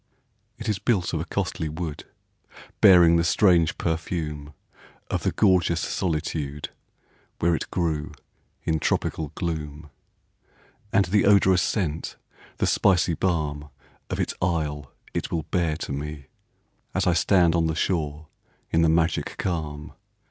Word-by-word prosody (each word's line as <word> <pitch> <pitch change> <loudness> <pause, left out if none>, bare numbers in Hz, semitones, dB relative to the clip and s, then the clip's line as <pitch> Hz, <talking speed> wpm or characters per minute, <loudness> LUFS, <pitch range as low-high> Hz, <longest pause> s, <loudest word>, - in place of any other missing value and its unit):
It 115 - -7
is 105 -4 0
built 100 -5 0
of 80 - 0
a 80 - -3
costly 85 -4 -2
wood, 80 -1 -5 0.8
Bearing 85 -3 +7
the 85 - +2
strange 85 -2 +3
perfume 80 -3 -3 0.6
Of - - 0
the - - 0
gorgeous 90 -5 +3
solitude, 75 -5 -2 0.7
Where 85 +1 +2
it 80 - -3
grew 80 -4 -2 0.5
in 80 -1 0
tropical 75 0 -1
gloom; 75 -3 -5 1.0
And 100 - +3
the 100 +3 +2
odorous 95 -3 +5
scent, 85 -7 -2 0.4
the - - +1
spicy 90 -4 +3
balm 75 -5 -1 0.4
Of - - -3
its - - -1
isle 75 -6 -1 0.2
it - - -2
will 80 -2 -1
bear 85 -3 0
to 85 - -5
me, 75 0 -5 0.7
As - - +1
I 90 - +3
stand 85 0 +3
on 85 -1 +2
the 80 - -1
shore, 80 -3 -1 0.5
in 80 - +3
the 80 - +4
magic 80 0 +1
calm. 75 -3 -4
80 Hz, 135 wpm, -25 LUFS, 75-90 Hz, 1.0 s, Bearing